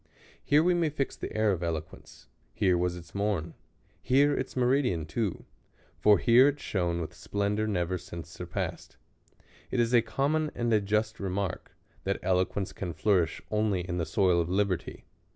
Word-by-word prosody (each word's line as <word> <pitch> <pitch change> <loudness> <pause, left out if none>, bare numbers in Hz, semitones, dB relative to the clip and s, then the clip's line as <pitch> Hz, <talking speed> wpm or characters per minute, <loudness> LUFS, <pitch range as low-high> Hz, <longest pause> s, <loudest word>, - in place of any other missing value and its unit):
Here 150 +2 +4
we 180 +1 +3
may 170 -2 +1
fix 140 -2 -3
the - - -6
era 110 -2 +3
of 90 - -4
eloquence; 80 -2 -6 0.3
here 95 -3 +3
was 90 0 0
its 85 -2 -12
morn; 100 -5 -1 0.5
here 140 +3 +3
its 130 - -4
meridian 125 - +2
too; 95 +4 -3 0.5
for 105 -1 +6
here 125 +3 +6
it 145 0 0
shone 85 -7 -1
with 80 -3 -5
splendor 105 +1 -1
never 90 -3 -1
since 85 -2 -8
surpassed. - - -5 0.7
It 125 - -1
is 120 +1 +2
a 120 - +6
common 145 +7 0
and 120 -1 0
a 105 - +4
just 105 +2 -1
remark, 95 -1 -3 0.3
that 100 +1 -1
eloquence 95 +1 0
can 90 -3 -5
flourish 85 0 +1
only 105 -3 +1
in 90 0 -3
the 85 - -1
soil 90 0 +3
of 85 - -3
liberty. 95 -2 -1
100 Hz, 170 wpm, -29 LUFS, 90-115 Hz, 0.7 s, for